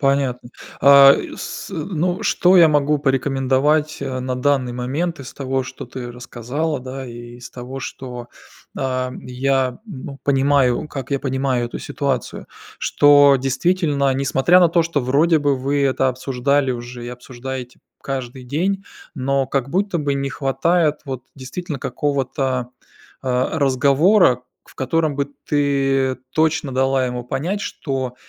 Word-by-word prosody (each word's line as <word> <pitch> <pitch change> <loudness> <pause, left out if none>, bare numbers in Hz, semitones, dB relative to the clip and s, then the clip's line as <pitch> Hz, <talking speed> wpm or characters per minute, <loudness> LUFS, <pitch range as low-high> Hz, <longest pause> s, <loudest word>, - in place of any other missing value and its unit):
Понятно, 135 -3 0 0.3
а, 140 0 +9 0.2
с - - -7
ну, 180 +3 -2
что 185 -2 +4
я 170 -2 +8
могу 150 0 +2
порекомендовать, 135 +2 +1
а, 130 -2 -3
на 130 0 -2
данный 125 -1 +1
момент 140 +7 -2
из 135 - -9
того, 135 -1 -2
что 130 +1 -8
ты 125 -2 -7
рассказала, 125 +5 -4
да, 130 +1 -7
и 120 0 -10
из 120 0 -11
того, 130 +2 -7
что, 125 -2 -7 0.5
ам, 130 -1 -2
я 130 0 0
бу 140 - -8
понимаю, 140 0 +2
как 135 -1 -6
я 140 - 0
понимаю 130 -2 0
эту - - -6
ситуацию. 135 -5 -3 0.3
Что 145 -1 +5
действительно, 140 +1 +1
несмотря 135 +6 +3
на 175 -2 +5
то, 170 +1 +3
что 165 -2 -1
вроде 150 +6 +3
бы 145 -2 +1
вы 140 +2 0
это 135 0 +2
обсуждали 130 +2 0
уже 120 0 -7
и - - -5
обсуждаете 125 0 -7 0.2
каждый 130 -1 -5
день, 180 +10 -1 0.3
но 135 +1 0
как 135 0 -2
будто 190 +1 0
бы 145 -2 0
не 140 0 -2
хватает, 155 +4 +1
вот, 130 -3 -5
действительно 145 +3 -6
какого-то, 130 -2 -2 0.5
а, 130 +4 0
разговора. 140 - +4 0.2
В - - -20
котором 155 +1 0
бы 140 0 -1 0.2
ты 135 -2 +1 0.2
точно 160 -3 +1
дала 130 0 +2
ему 125 0 -4
понять, 170 +11 -2
что, 135 -10 -4
135 Hz, 140 wpm, -20 LUFS, 130-145 Hz, 0.5 s, а